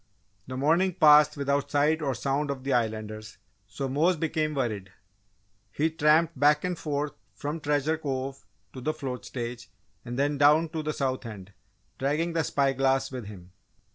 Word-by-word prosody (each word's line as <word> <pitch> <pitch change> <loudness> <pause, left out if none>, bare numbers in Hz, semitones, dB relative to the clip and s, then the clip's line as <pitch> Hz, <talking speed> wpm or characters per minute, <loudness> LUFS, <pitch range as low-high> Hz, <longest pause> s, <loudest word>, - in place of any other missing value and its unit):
The 130 0 -5
morning 165 +6 +2
passed 150 -2 +6
without 140 0 0
sight 150 +2 +2
or 135 -4 -1
sound 140 +5 -1
of 135 -2 -4
the 135 - 0
Islanders 110 -2 -2 0.3
so 105 +7 -4
Mose 160 +7 +2
became 155 -1 -1
worried. 105 -8 -2 0.8
He 160 +2 0
tramped 155 -1 +3
back 150 +1 +4
and 180 -1 -1
forth 150 -2 -3 0.2
from 150 +3 -4
Treasure 150 +1 0
Cove 135 -4 -4 0.3
to 130 - -8
the 155 +4 -1
float 130 -6 -5
stage 120 0 -6 0.3
and 120 0 -6
then 145 +1 0
down 150 +3 +5
to 160 0 -3
the 155 0 -2
South 130 -2 -2
End, 100 -3 -10 0.5
dragging 150 +5 0
the 165 -1 +1
spy 140 -2 +1
glass 135 0 +1
with 125 -5 -6
him. 90 -4 -11
140 Hz, 170 wpm, -27 LUFS, 130-155 Hz, 0.8 s, passed